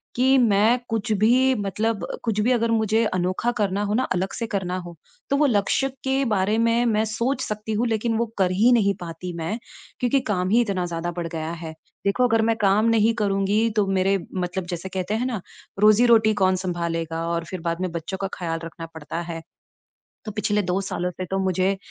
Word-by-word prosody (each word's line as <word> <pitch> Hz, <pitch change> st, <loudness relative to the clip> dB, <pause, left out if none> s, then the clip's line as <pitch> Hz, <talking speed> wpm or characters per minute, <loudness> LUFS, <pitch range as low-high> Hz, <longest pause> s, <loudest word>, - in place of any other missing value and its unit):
कि 265 Hz, +2 st, +4 dB
मैं 225 Hz, 0 st, +4 dB
कुछ 225 Hz, 0 st, -2 dB
भी 255 Hz, +5 st, +4 dB
मतलब 205 Hz, -1 st, -1 dB, 0.2 s
कुछ 220 Hz, -3 st, -1 dB
भी 240 Hz, +4 st, +2 dB
अगर 230 Hz, -2 st, +2 dB
मुझे 220 Hz, 0 st, +2 dB
अनोखा 185 Hz, +4 st, 0 dB
करना 200 Hz, -1 st, 0 dB
हो 205 Hz, 0 st, -1 dB
ना 255 Hz, -, +2 dB
अलग 185 Hz, +1 st, -2 dB
से 230 Hz, -, -3 dB
करना 185 Hz, -3 st, -2 dB
हो, 175 Hz, -2 st, -8 dB, 0.3 s
तो 280 Hz, -, +2 dB
वो 300 Hz, -, +4 dB
लक्ष्य 230 Hz, +4 st, +1 dB, 0.2 s
के 265 Hz, +1 st, +1 dB
बारे 210 Hz, -1 st, +1 dB
में 230 Hz, +1 st, +2 dB
मैं 220 Hz, -2 st, +2 dB
सोच 235 Hz, +5 st, -1 dB
सकती 215 Hz, -1 st, -4 dB
हूँ 230 Hz, +3 st, +1 dB
लेकिन 225 Hz, 0 st, 0 dB
वो 235 Hz, -, +1 dB
कर 185 Hz, -2 st, +3 dB
ही 215 Hz, +7 st, +4 dB
नहीं 200 Hz, -4 st, +3 dB
पाती 175 Hz, +1 st, -6 dB
मैं 165 Hz, +7 st, -3 dB, 0.4 s
क्योंकि 250 Hz, +2 st, +3 dB
काम 185 Hz, -2 st, 0 dB
ही 230 Hz, +4 st, +4 dB
इतना 195 Hz, -6 st, -1 dB
ज़्यादा 175 Hz, 0 st, -3 dB
बढ़ 170 Hz, -1 st, -2 dB
गया 160 Hz, -1 st, -4 dB
है, 165 Hz, -1 st, -6 dB, 0.3 s
देखो 245 Hz, +6 st, +3 dB
अगर 225 Hz, -1 st, +2 dB
मैं -, -, +1 dB
काम 200 Hz, +2 st, +3 dB
नहीं 225 Hz, 0 st, +3 dB
करूँगी 200 Hz, +3 st, +1 dB
तो 205 Hz, -2 st, +3 dB
मेरे 195 Hz, +1 st, +2 dB, 0.2 s
मतलब 180 Hz, 0 st, -2 dB
जैसे 175 Hz, +2 st, -5 dB
कहते 190 Hz, +2 st, -3 dB
हैं 235 Hz, +3 st, -1 dB
ना, 235 Hz, -6 st, -2 dB, 0.4 s
रोज़ी-रोटी 220 Hz, +1 st, +5 dB
कौन 185 Hz, 0 st, +4 dB
सँभालेगा? 165 Hz, -2 st, -3 dB
और 170 Hz, 0 st, -2 dB
फिर 180 Hz, +1 st, -6 dB
बाद 170 Hz, +1 st, -2 dB
में 185 Hz, -2 st, -2 dB
बच्चों 170 Hz, +3 st, -4 dB
का 195 Hz, -, 0 dB
ख़्याल 165 Hz, -2 st, -2 dB
रखना 165 Hz, 0 st, -8 dB
पड़ता 160 Hz, +2 st, -5 dB
है। 165 Hz, 0 st, -5 dB, 0.8 s
तो 215 Hz, -, -4 dB
पिछले 210 Hz, 0 st, 0 dB
2 180 Hz, +1 st, 0 dB
सालों 180 Hz, -2 st, -2 dB
से 185 Hz, +1 st, -6 dB
तो 195 Hz, -, +1 dB
मुझे 190 Hz, +1 st, +1 dB
200 Hz, 205 wpm, -23 LUFS, 180-225 Hz, 0.8 s, रोज़ी-रोटी